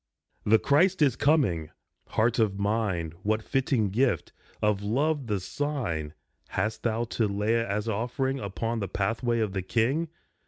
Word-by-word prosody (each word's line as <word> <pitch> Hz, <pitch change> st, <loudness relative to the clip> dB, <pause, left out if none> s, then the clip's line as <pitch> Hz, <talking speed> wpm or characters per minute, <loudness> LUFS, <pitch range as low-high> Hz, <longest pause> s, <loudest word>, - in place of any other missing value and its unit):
The 110 Hz, +2 st, +7 dB
Christ 170 Hz, -, +3 dB
is 135 Hz, -5 st, +3 dB
coming! 130 Hz, -, +2 dB, 0.4 s
Heart 115 Hz, +2 st, +1 dB
of 105 Hz, -3 st, +2 dB
mine, 100 Hz, -5 st, 0 dB
What 110 Hz, +2 st, 0 dB
fitting 130 Hz, -6 st, +1 dB
gift, 125 Hz, +5 st, +1 dB, 0.3 s
of 105 Hz, -2 st, +1 dB
love 140 Hz, +6 st, 0 dB
the 105 Hz, -3 st, 0 dB
sign, 95 Hz, -, -3 dB, 0.3 s
Hast 110 Hz, 0 st, -2 dB
thou 115 Hz, 0 st, 0 dB
to 115 Hz, -1 st, 0 dB
lay 105 Hz, +3 st, +1 dB
as 105 Hz, +1 st, -2 dB
offering 125 Hz, +5 st, -1 dB
Upon 115 Hz, +3 st, -3 dB
the 100 Hz, -, -2 dB
pathway 115 Hz, +5 st, 0 dB
of 105 Hz, -3 st, -1 dB
the 95 Hz, -, -1 dB
King? 125 Hz, -, +1 dB
110 Hz, 150 wpm, -27 LUFS, 100-130 Hz, 0.4 s, The